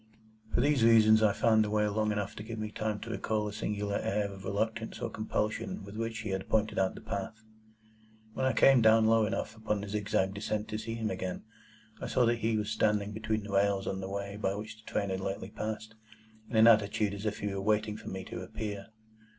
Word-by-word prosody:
For -, -, +2 dB
these 140 Hz, -3 st, +3 dB
reasons, 110 Hz, -1 st, +6 dB
I 110 Hz, -2 st, +5 dB
found 110 Hz, +1 st, +3 dB
the 105 Hz, -, -2 dB
way 105 Hz, 0 st, +2 dB
long 105 Hz, +1 st, 0 dB
enough 105 Hz, -1 st, -2 dB
to -, -, -5 dB
give 115 Hz, +1 st, -6 dB
me 110 Hz, 0 st, -4 dB
time 110 Hz, 0 st, -2 dB
to 115 Hz, -, -6 dB
recall 110 Hz, -1 st, -1 dB
a 105 Hz, -, -5 dB
singular 105 Hz, -1 st, -2 dB
air 100 Hz, 0 st, -1 dB
of 95 Hz, -1 st, -11 dB
reluctance 110 Hz, +3 st, -2 dB
or 115 Hz, -, -3 dB
compulsion 110 Hz, -, -2 dB
with 100 Hz, +1 st, -10 dB
which 115 Hz, 0 st, -3 dB
he -, -, -4 dB
had 95 Hz, 0 st, -3 dB
pointed 110 Hz, 0 st, +1 dB
out 95 Hz, 0 st, +1 dB
the -, -, -9 dB
path. 110 Hz, +3 st, -5 dB, 0.9 s
When 130 Hz, -, 0 dB
I 130 Hz, -, +2 dB
came 135 Hz, -3 st, +6 dB
down 110 Hz, 0 st, +6 dB
low 110 Hz, -1 st, +4 dB
enough 110 Hz, 0 st, -3 dB
upon 110 Hz, -1 st, -2 dB
the 100 Hz, -, -6 dB
zigzag 100 Hz, -2 st, 0 dB
descent 105 Hz, +1 st, -3 dB
to 110 Hz, -, -3 dB
see 115 Hz, +1 st, -4 dB
him 110 Hz, -1 st, -2 dB
again, 95 Hz, -1 st, -4 dB, 0.6 s
I -, -, -3 dB
saw 125 Hz, -, +3 dB
that 120 Hz, 0 st, +2 dB
he 115 Hz, -1 st, +1 dB
was 105 Hz, 0 st, -2 dB
standing 105 Hz, -2 st, +1 dB
between 110 Hz, 0 st, -2 dB
the 105 Hz, -, -7 dB
rails 100 Hz, 0 st, +2 dB
on 95 Hz, -, -2 dB
the 95 Hz, -, -5 dB
way 100 Hz, +1 st, -4 dB
by 100 Hz, -2 st, -1 dB
which 105 Hz, +1 st, -6 dB
the 110 Hz, -, -13 dB
train 100 Hz, -1 st, 0 dB
had 95 Hz, -, -2 dB
lately 95 Hz, +1 st, -4 dB
passed, 110 Hz, 0 st, -5 dB, 0.6 s
in 120 Hz, -, -5 dB
an 110 Hz, 0 st, +7 dB
attitude 105 Hz, -2 st, +4 dB
as 100 Hz, +2 st, -4 dB
if 105 Hz, -, -2 dB
he 105 Hz, -1 st, -3 dB
were 100 Hz, -, -3 dB
waiting 105 Hz, +1 st, +1 dB
for -, -, -8 dB
me 95 Hz, 0 st, -5 dB
to 90 Hz, -, -7 dB
appear. 100 Hz, +1 st, -5 dB
105 Hz, 230 wpm, -31 LUFS, 100-110 Hz, 0.9 s, an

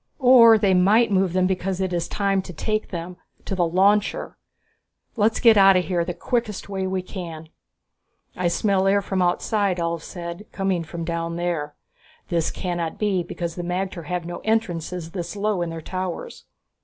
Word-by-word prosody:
"Or 245 Hz, -4 st, +7 dB
they 200 Hz, -3 st, +2 dB
might 205 Hz, +5 st, +4 dB
move 190 Hz, -2 st, +2 dB
them 185 Hz, 0 st, +2 dB
because 185 Hz, 0 st, -1 dB
it 190 Hz, -1 st, -1 dB
is 170 Hz, -1 st, -1 dB
time 195 Hz, -1 st, 0 dB
to 185 Hz, -, -9 dB
take 215 Hz, +6 st, -2 dB
them 175 Hz, 0 st, -6 dB, 0.3 s
to -, -, -3 dB
the 175 Hz, -3 st, +1 dB
launcher! 200 Hz, +4 st, +1 dB, 0.8 s
Let's 220 Hz, 0 st, +2 dB
get 225 Hz, -3 st, +6 dB
out 195 Hz, -1 st, +7 dB
of 180 Hz, -, 0 dB
here, 175 Hz, -2 st, 0 dB
the 175 Hz, 0 st, -4 dB
quickest 235 Hz, -5 st, -2 dB
way 190 Hz, -1 st, -3 dB
we 185 Hz, -1 st, -2 dB
can." 165 Hz, -4 st, -8 dB, 0.9 s
"I 180 Hz, -1 st, 0 dB
smell 190 Hz, +2 st, +1 dB
air 200 Hz, +1 st, +3 dB
from 190 Hz, -1 st, -1 dB
outside," 185 Hz, +2 st, +1 dB
Ulv 170 Hz, -1 st, -2 dB
said, 170 Hz, +5 st, -8 dB
"coming 190 Hz, -3 st, -1 dB
from 165 Hz, +1 st, -6 dB
down 170 Hz, 0 st, -3 dB
there. 170 Hz, -4 st, -2 dB, 0.5 s
This 170 Hz, -2 st, 0 dB
cannot 175 Hz, -3 st, -3 dB
be, 200 Hz, -4 st, +1 dB
because 170 Hz, 0 st, -5 dB
the 175 Hz, -, -5 dB
magter 180 Hz, -1 st, -3 dB
have 180 Hz, +2 st, -3 dB
no 175 Hz, 0 st, -6 dB
entrances 180 Hz, -6 st, -2 dB
this 175 Hz, 0 st, -5 dB
low 205 Hz, -2 st, 0 dB
in 170 Hz, -, -2 dB
their 165 Hz, 0 st, -6 dB
towers." 185 Hz, +1 st, -5 dB
185 Hz, 180 wpm, -23 LUFS, 170-200 Hz, 0.9 s, Or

